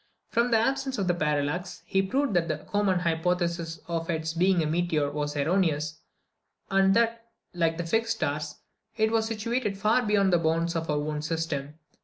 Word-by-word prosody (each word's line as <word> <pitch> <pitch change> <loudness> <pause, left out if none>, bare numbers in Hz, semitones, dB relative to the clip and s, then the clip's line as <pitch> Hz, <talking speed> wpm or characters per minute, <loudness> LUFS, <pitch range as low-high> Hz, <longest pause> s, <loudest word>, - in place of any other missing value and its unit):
From 235 +1 +2
the 230 - +4
absence 270 +3 0
of 195 - -1
parallax, 150 +4 -1
he 195 - +2
proved 260 +5 0
that 170 -2 +2
the 155 -3 -1
common 190 +2 0
hypothesis 170 0 -1
of 165 -1 -3
its 160 -1 -1
being 180 0 +3
a - - -1
meteor 155 -2 0
was 145 0 -3
erroneous, 155 -1 +1 0.7
and 195 0 +4
that, 230 0 +1 0.3
like 165 -2 +1
the 175 - -3
fixed 225 +6 +1
stars, 150 -5 -2 0.4
it 220 0 +2
was 225 -1 +1
situated 225 -1 -2
far 215 +5 +3
beyond 205 -4 +2
the 175 - +5
bounds 165 +1 0
of 165 -1 -2
our 150 - +1
own 150 0 -2
system. 155 -2 -3
175 Hz, 175 wpm, -27 LUFS, 160-210 Hz, 0.7 s, the